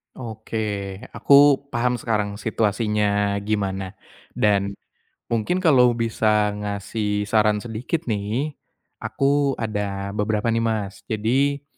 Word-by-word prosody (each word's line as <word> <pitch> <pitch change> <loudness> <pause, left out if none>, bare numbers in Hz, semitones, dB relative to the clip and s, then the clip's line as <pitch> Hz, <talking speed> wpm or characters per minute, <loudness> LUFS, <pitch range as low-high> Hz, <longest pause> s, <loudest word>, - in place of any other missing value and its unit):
Oke. 110 -2 -6 0.5
Aku 140 0 +6 0.2
paham 120 +1 +1
sekarang 105 -3 -2
situasinya 105 -2 0
gimana, 100 -2 -2 0.4
dan 100 -1 +1 0.5
mungkin 115 - 0
kalau 125 -7 +5
bisa 110 -2 +1
ngasih 105 0 -3
saran 105 0 +2
sedikit 120 +8 -3
nih 110 +8 -2 0.5
aku 140 0 +1
ada 100 -3 -3
beberapa 105 +2 0
nih, 115 - +1
Mas. 110 -4 -2
Jadi 135 +6 0
110 Hz, 100 wpm, -23 LUFS, 105-120 Hz, 0.5 s, Aku